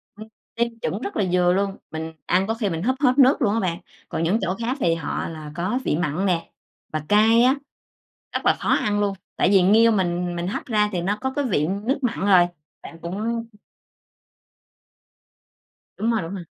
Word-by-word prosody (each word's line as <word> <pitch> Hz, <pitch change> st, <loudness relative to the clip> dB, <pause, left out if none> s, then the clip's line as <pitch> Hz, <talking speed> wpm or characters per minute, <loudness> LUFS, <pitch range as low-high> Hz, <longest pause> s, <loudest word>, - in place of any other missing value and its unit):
Ừm. 215 Hz, +1 st, -10 dB, 0.3 s
Nêm 235 Hz, -1 st, -1 dB
chuẩn 205 Hz, +6 st, -2 dB
rất 400 Hz, -, -5 dB
là 200 Hz, -, +2 dB
vừa 180 Hz, 0 st, +3 dB
luôn, 195 Hz, 0 st, -1 dB
mình 160 Hz, 0 st, -5 dB
ăn 190 Hz, +3 st, +2 dB
có 225 Hz, -, 0 dB
khi 220 Hz, -4 st, -2 dB
mình 165 Hz, +1 st, -3 dB
húp 260 Hz, +3 st, +1 dB
hết 255 Hz, 0 st, +3 dB
nước 270 Hz, +3 st, +5 dB
luôn 210 Hz, -4 st, +2 dB
á 230 Hz, -, +1 dB
bạn. 175 Hz, -4 st, -1 dB, 0.3 s
Còn 165 Hz, -, -2 dB
những 190 Hz, +7 st, +2 dB
chỗ 190 Hz, 0 st, -1 dB
khác 240 Hz, +4 st, -2 dB
thì 165 Hz, -1 st, +3 dB
họ 165 Hz, -3 st, -3 dB
là 155 Hz, -2 st, -8 dB
có 185 Hz, +9 st, -1 dB
vị 150 Hz, -, +1 dB
mặn 175 Hz, +2 st, -1 dB
nè, 170 Hz, -3 st, -1 dB, 0.4 s
và 155 Hz, -1 st, -2 dB
cay 220 Hz, +3 st, +5 dB
á, 260 Hz, +3 st, +4 dB, 0.8 s
rất -, -, -3 dB
là -, -, +4 dB
khó -, -, -3 dB
ăn 205 Hz, 0 st, +2 dB
luôn, 200 Hz, -1 st, 0 dB, 0.2 s
tại -, -, +2 dB
vì 195 Hz, -2 st, +5 dB
nghêu 225 Hz, +4 st, +5 dB
mình 175 Hz, -3 st, 0 dB
mình 170 Hz, +1 st, -3 dB
hấp 280 Hz, -, -4 dB
ra 210 Hz, -4 st, +1 dB
thì 175 Hz, -, -1 dB
nó 200 Hz, +4 st, -1 dB
có 265 Hz, 0 st, -2 dB
cái 285 Hz, -, 0 dB
vị 160 Hz, -, +1 dB
nước 210 Hz, +9 st, -1 dB
mặn 240 Hz, -2 st, -1 dB
rồi. 180 Hz, -3 st, +6 dB, 0.4 s
Bạn 165 Hz, -, -11 dB
cũng 220 Hz, +7 st, -3 dB, 2.5 s
Đúng 225 Hz, +2 st, 0 dB
rồi, 225 Hz, -, +1 dB
đúng 165 Hz, +2 st, -6 dB
rồi. 185 Hz, -, -6 dB
200 Hz, 210 wpm, -23 LUFS, 175-230 Hz, 2.5 s, rồi